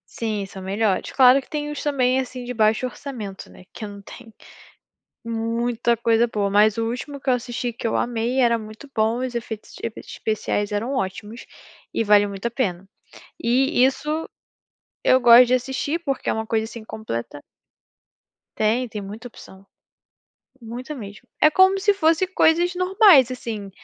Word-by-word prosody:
Sim, 215 Hz, -3 st, -3 dB
são 195 Hz, 0 st, -10 dB
melhores 195 Hz, +1 st, -1 dB
claro 260 Hz, +1 st, +6 dB
que -, -, -22 dB
tem 295 Hz, -1 st, -3 dB
uns, 295 Hz, -, -5 dB
também, 260 Hz, -3 st, +1 dB
assim, 255 Hz, -1 st, -5 dB
de 245 Hz, 0 st, -5 dB
baixo 220 Hz, +1 st, +2 dB
orçamento, 240 Hz, -7 st, -7 dB
né, -, -, -15 dB
que 220 Hz, -, -7 dB
eu -, -, -7 dB
não 200 Hz, 0 st, -10 dB
tenho 225 Hz, +3 st, -13 dB, 0.9 s
muita 230 Hz, +1 st, -1 dB
coisa 230 Hz, 0 st, +3 dB
boa, 210 Hz, -4 st, -2 dB
mas 210 Hz, +1 st, +4 dB
o 225 Hz, 0 st, -1 dB
último 280 Hz, +4 st, -6 dB
que 270 Hz, -, -3 dB
eu -, -, +5 dB
assisti, 245 Hz, 0 st, -3 dB
que 230 Hz, -, -9 dB
eu 225 Hz, -, 0 dB
amei, 240 Hz, +2 st, -1 dB
era 235 Hz, -2 st, +3 dB
muito 220 Hz, +5 st, -11 dB
bom, 220 Hz, +1 st, +1 dB
os 255 Hz, -1 st, -4 dB
efeitos 225 Hz, -2 st, -6 dB
efeitos 230 Hz, -, -6 dB
especiais 210 Hz, -1 st, -2 dB
eram 220 Hz, +6 st, -2 dB
ótimos, 205 Hz, -1 st, -4 dB, 0.5 s
e -, -, 0 dB
vale 210 Hz, -1 st, +5 dB
muito 200 Hz, +1 st, -8 dB
a -, -, +2 dB
pena. 195 Hz, -7 st, -2 dB, 0.6 s
E, 255 Hz, +3 st, +2 dB
isso, 300 Hz, +4 st, -1 dB, 0.8 s
eu 255 Hz, -, +5 dB
gosto 240 Hz, 0 st, +8 dB
de 250 Hz, -, +2 dB
assistir 265 Hz, +6 st, -2 dB
porque 275 Hz, -3 st, -3 dB
é -, -, +1 dB
uma 220 Hz, 0 st, -3 dB
coisa 220 Hz, 0 st, 0 dB
assim 225 Hz, 0 st, -9 dB
completa 145 Hz, -, -6 dB, 1.2 s
Tem, 225 Hz, +4 st, +1 dB
tem 215 Hz, -2 st, -6 dB
muita 210 Hz, +5 st, -8 dB
opção. 195 Hz, -4 st, -15 dB, 1.0 s
Muita 245 Hz, +5 st, -7 dB
mesmo. 215 Hz, -1 st, -10 dB
É 305 Hz, -, +6 dB
como 375 Hz, +3 st, +4 dB
se 410 Hz, +1 st, +3 dB
fosse 330 Hz, -1 st, +2 dB
coisas 350 Hz, -1 st, +2 dB
normais, 365 Hz, -, +5 dB
assim, 220 Hz, -5 st, -6 dB
235 Hz, 170 wpm, -22 LUFS, 215-265 Hz, 1.2 s, gosto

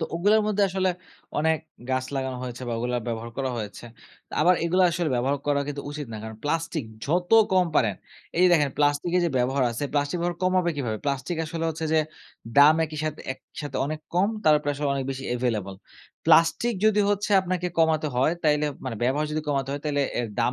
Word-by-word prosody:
তো -, -, 0 dB
ওগুলার 205 Hz, +6 st, +4 dB
মধ্যে 205 Hz, -1 st, +1 dB
আসলে 190 Hz, 0 st, 0 dB, 0.5 s
অনেক 160 Hz, +1 st, +2 dB, 0.3 s
গাছ 130 Hz, 0 st, 0 dB
লাগানো 130 Hz, -1 st, -2 dB
হয়েছে 125 Hz, 0 st, -6 dB
বা -, -, -2 dB
ওগুলা 125 Hz, +1 st, -1 dB
ব্যবহার 115 Hz, 0 st, -4 dB
করা 135 Hz, -1 st, -1 dB
হয়েছে। 105 Hz, 0 st, -6 dB, 0.6 s
আবার 180 Hz, -, +5 dB
এগুলা 185 Hz, +2 st, +3 dB
আসলে 170 Hz, -1 st, -1 dB
ব্যবহার 130 Hz, +4 st, +1 dB
করা 145 Hz, -1 st, +2 dB
কিন্তু 145 Hz, -1 st, -4 dB
উচিত 145 Hz, -1 st, -5 dB
না। -, -, -5 dB
কারণ 110 Hz, 0 st, -7 dB
প্লাস্টিক, 165 Hz, -1 st, -1 dB, 0.2 s
যত 175 Hz, +4 st, 0 dB, 0.2 s
কম 185 Hz, -1 st, +4 dB
পারেন 105 Hz, -5 st, +3 dB, 0.4 s
এই -, -, +2 dB
যে -, -, +7 dB
দেখেন 150 Hz, -5 st, +3 dB
প্লাস্টিকের 145 Hz, +5 st, +2 dB
যে 170 Hz, -, +1 dB
ব্যবহার 130 Hz, +2 st, +1 dB
আছে, 120 Hz, +5 st, -3 dB
প্লাস্টিক 145 Hz, +2 st, 0 dB
ব্যবহার 175 Hz, 0 st, -2 dB
কমাবে 185 Hz, -1 st, +2 dB
কিভাবে? 115 Hz, -6 st, -2 dB
প্লাস্টিক 140 Hz, +4 st, -2 dB
আসলে 165 Hz, +1 st, -4 dB
হচ্ছে 160 Hz, +1 st, -5 dB
যে 160 Hz, -, +4 dB, 0.6 s
দাম 145 Hz, +2 st, +8 dB
একই 155 Hz, -1 st, -7 dB
সাথে 155 Hz, -1 st, -3 dB
একসাথে 140 Hz, +1 st, -8 dB
অনেক 155 Hz, +1 st, -4 dB
কম, 185 Hz, +3 st, +3 dB, 0.2 s
তারপরে 150 Hz, -2 st, +4 dB
আসলে 145 Hz, +1 st, -2 dB
অনেক 135 Hz, -1 st, -2 dB
বেশি 135 Hz, 0 st, -5 dB
available। 105 Hz, -6 st, -2 dB, 0.5 s
প্লাস্টিক 165 Hz, +8 st, +4 dB
যদি 215 Hz, -1 st, +4 dB
হচ্ছে 205 Hz, 0 st, -1 dB
আপনাকে 180 Hz, -1 st, -2 dB
কমাতে 160 Hz, -1 st, +3 dB
হয়, 130 Hz, +6 st, +3 dB
তাইলে 150 Hz, -1 st, +2 dB, 0.2 s
মানে 125 Hz, -3 st, -4 dB
ব্যবহার 140 Hz, +5 st, +1 dB
যদি 155 Hz, -, -1 dB
কমাতে 135 Hz, -2 st, 0 dB
হয়। 145 Hz, -, -4 dB
তাইলে 145 Hz, -2 st, +1 dB, 0.2 s
এর 120 Hz, -, 0 dB
দাম 125 Hz, -, +2 dB
150 Hz, 195 wpm, -25 LUFS, 130-170 Hz, 0.6 s, দাম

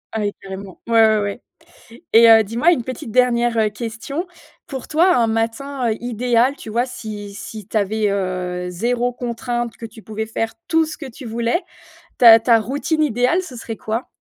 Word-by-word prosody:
Ah -, -, 0 dB
oui, 205 Hz, -1 st, -1 dB
carrément. 195 Hz, -1 st, -9 dB
Ouais, 225 Hz, -1 st, +5 dB
ouais, 215 Hz, -1 st, +3 dB
ouais. 205 Hz, +3 st, -4 dB, 0.7 s
Et 230 Hz, +1 st, +8 dB
heu, 225 Hz, 0 st, +8 dB
dis-moi 235 Hz, -, +2 dB
une 295 Hz, -, 0 dB
petite 255 Hz, -2 st, -6 dB
dernière, 240 Hz, -1 st, +2 dB
heu, 215 Hz, -1 st, +3 dB
question. 230 Hz, -, -5 dB, 0.4 s
Pour 265 Hz, -3 st, -7 dB
toi, 345 Hz, +4 st, +4 dB
un 235 Hz, -, +3 dB
matin 230 Hz, +3 st, -1 dB
idéal, 245 Hz, +2 st, +1 dB
tu 220 Hz, -, -9 dB
vois, 235 Hz, +3 st, 0 dB
si 210 Hz, -5 st, -8 dB
si 215 Hz, 0 st, -8 dB
tu -, -, -5 dB
avais, 210 Hz, +1 st, +1 dB
heu, 180 Hz, -2 st, -3 dB
0 240 Hz, +6 st, -1 dB
contrainte, 240 Hz, -1 st, -4 dB
que -, -, -10 dB
tu 225 Hz, 0 st, -10 dB
pouvais 220 Hz, +1 st, -4 dB
faire 225 Hz, 0 st, -3 dB
tout 325 Hz, -1 st, +3 dB
ce 310 Hz, -, -7 dB
que 315 Hz, -, -9 dB
tu 250 Hz, +2 st, -11 dB
voulais, 235 Hz, +7 st, 0 dB, 0.6 s
ta 230 Hz, -2 st, +9 dB
ta 230 Hz, 0 st, +4 dB
routine 290 Hz, +7 st, -1 dB
idéale, 255 Hz, +5 st, +2 dB
ce 270 Hz, -9 st, -10 dB
serait 225 Hz, -1 st, -6 dB
quoi? 225 Hz, +3 st, -3 dB
230 Hz, 185 wpm, -20 LUFS, 220-250 Hz, 0.7 s, ta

